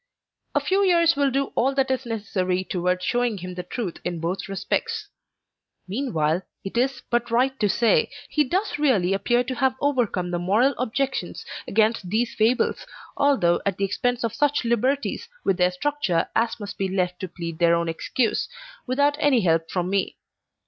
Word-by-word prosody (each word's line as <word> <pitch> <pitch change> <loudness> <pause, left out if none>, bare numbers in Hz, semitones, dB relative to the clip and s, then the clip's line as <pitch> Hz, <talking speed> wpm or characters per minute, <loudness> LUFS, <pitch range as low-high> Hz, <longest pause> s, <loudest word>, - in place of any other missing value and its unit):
A - - +5
few 390 +1 +1
years 335 -4 +4
will 280 -1 +2
do 270 +1 -1
all 270 +3 +1
that 270 -1 +1
is 260 -1 -2
necessary 185 -5 -1
towards 180 0 -1
showing 245 -3 +1
him 180 0 -6
the 180 - -4
truth 180 0 -5
in 175 -1 -3
both 175 +4 -3
respects. 425 - -2 0.8
Meanwhile, 185 - 0 0.2
it 195 - -6
is 260 +2 0
but 240 0 +1
right 250 +3 +2
to 210 - +2
say, 230 +2 +3 0.2
he 300 - +2
does 370 +6 -1
really 210 -11 +3
appear 240 +5 +2
to 255 +1 -4
have 265 -1 +1
overcome 235 -11 0
the 175 - -1
moral 215 +10 +3
objections 265 +3 -2 0.2
against 215 -3 +1
these 225 +4 0
fables, 230 +3 +1 0.3
although 265 -12 +3
at 195 -2 -1
the 200 - +1
expense 245 +4 -1
of 230 - -1
such 290 -3 +1
liberties 265 - 0
with 195 -2 +1
their 180 -1 +4
structure 180 -4 0
as 230 0 +1
must 205 -1 -7
be 195 - +1
left 180 -1 -1
to 185 - -4
plead 170 -2 -7
their 170 -1 +5
own 170 0 0
excuse, 220 +8 -1 0.4
without 285 +3 +2
any 280 -6 +4
help 165 -2 +1
from 180 -1 -1
me. 195 0 -1
225 Hz, 175 wpm, -24 LUFS, 185-265 Hz, 0.8 s, A